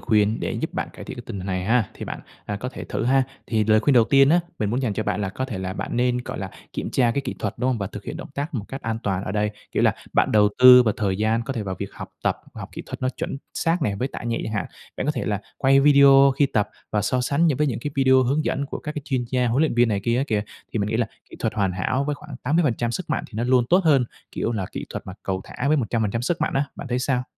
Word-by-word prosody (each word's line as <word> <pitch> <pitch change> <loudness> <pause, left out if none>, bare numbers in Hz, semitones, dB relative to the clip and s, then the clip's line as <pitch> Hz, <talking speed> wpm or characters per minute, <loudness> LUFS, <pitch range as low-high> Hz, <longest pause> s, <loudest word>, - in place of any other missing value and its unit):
khuyên, 110 -1 +2
để - - -2
giúp - - -3
bạn - - -2
cải - - -10
thiện - - -7
cái 120 - -7
tình 105 -4 -5
hình 95 - -6
này 95 -1 -2
ha, 115 -1 +2
thì - - -7
bạn, - - -6 0.3
à, 105 - -2
có 125 +5 -4
thể 130 - -8
thử - - -3
ha. 135 +2 +4 0.2
Thì 110 -2 +1
lời 110 0 +4
khuyên 145 - +3
đầu 115 -2 +6
tiên 135 +2 +5
á, 175 +3 +5 0.2
mình 105 -2 0
muốn 125 +4 -1
dành 115 -5 0
cho - - -2
bạn 105 -1 -1
là 95 - -1
có 130 +7 -3
thể 120 -7 -5
là 95 0 -3
bạn - - -4
nên, 125 0 +2
gọi - - -5
là, 95 -1 -5 0.2
kiểm - - -4
tra 120 -3 +3
cái 140 - 0
kỹ 135 -2 -5
thuật, - - -2
đúng 125 +2 +1
hông, 120 - -1
và 100 - -2
thực - - -9
hiện - - -5
động - - -8
tác 145 +3 -3
một 110 - -2
cách 135 - -7
an 115 0 -2
toàn 95 -1 -1
ở 95 - -4
đây, 105 0 +1 0.2
kiểu, - - +1
là - - +4 0.2
bạn - - +2
đầu 105 -1 +5
tư 125 0 +10
vào 110 -3 +1
thời 95 -3 0
gian 110 +2 +1
có 135 - -4
thể 115 -4 -3
vào 95 -2 -3
việc - - -5
học - - -8 0.2
tập, - - +2 0.2
học - - -7
kỹ - - -7
thuật - - -7
nó 130 - +2
chuẩn 135 - -4 0.2
xác 165 0 +1
nè 105 -7 0
với 130 - -1
tạ - - -7
nhẹ 115 -1 -2
chẳng 110 - -4
hạn. 100 -5 -1 0.3
Bạn - - -2
có 150 - +2
thể - - -3
là 105 -1 -1 0.2
quay 135 0 +5
video 140 -1 +7
khi 145 - +5
tập 105 -6 0 0.2
và 105 -1 +1
so 125 +4 +1
sánh 140 +6 +2
những 145 -6 +1
với 150 - +3
những 120 - -1
cái 145 - -3
video 130 -1 +5
hướng 140 +5 +1
dẫn 140 +1 -1
của - - -5
các 150 - -5
cái 150 - -5
chuyên 130 -4 -1
gia, 125 -1 +2
huấn 125 +6 +2
luyện 155 - +1
viên 120 -1 +4
này 100 -2 0
kia 120 +1 +2
á 135 - +1
kìa, 105 -2 0 0.3
thì 110 - -1
mình 100 0 0
nghĩ 110 - 0
là 115 -1 +1 0.2
kỹ - - -10
thuật 115 - -1
hoàn 100 -3 +1
hảo 125 +9 0
với 150 0 -1
khoảng 145 -2 -10
80% 140 -7 +1
sức 180 +1 -4
mạnh - - 0
thì - - -23
nó 115 - 0
luôn 125 -1 +4
tốt 180 +2 +6
hơn, 140 -6 +5 0.3
kiểu, - - -1
là 95 -4 -2
kỹ - - -4
thuật - - -6
mà 95 - -6
cầu 95 -1 -2
thả 135 +3 -3
với 155 - +4
100% 115 -2 -1
sức 160 +7 -1
mạnh - - 0
á, 135 +1 +2
bạn 140 - -7
thấy 125 - 0
sao? 125 0 0
120 Hz, 315 wpm, -23 LUFS, 105-135 Hz, 0.3 s, tư